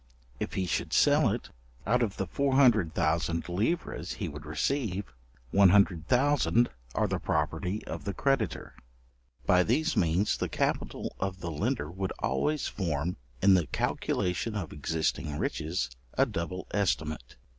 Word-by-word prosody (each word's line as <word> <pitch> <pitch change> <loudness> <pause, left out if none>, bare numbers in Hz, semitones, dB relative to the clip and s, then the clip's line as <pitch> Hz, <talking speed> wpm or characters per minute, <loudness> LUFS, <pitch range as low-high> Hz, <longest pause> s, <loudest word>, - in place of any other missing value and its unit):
If - - -3
he 95 - 0
should 90 - -2
sell - - +5
it; - - -4 0.3
out 125 +3 +2
of 105 -4 -1
the 95 - -1
400,000 85 - +2
livres 105 - -1
he - - -4
would 75 +1 -8
receive, 100 - -1 0.4
100,000 100 - +4 0.3
are - - +2
the - - -1
property 95 +4 -1
of - - -6
the 100 - -2
creditor. 135 - 0 0.7
By 90 0 +5
these 145 - +1
means 85 +5 +2
the - - -2
capital - - -2
of 95 -1 -2
the 85 -2 -4
lender 75 0 -1
would 95 +1 -3
always 65 - 0
form, 85 -2 -2 0.3
in 100 - +7
the 90 -5 +3
calculation 90 +10 -1
of 90 -6 -4
existing 75 0 -1
riches, 80 -4 -1 0.3
a - - +5
double 90 +2 -4
estimate. 80 -10 -1
90 Hz, 135 wpm, -29 LUFS, 80-110 Hz, 0.7 s, in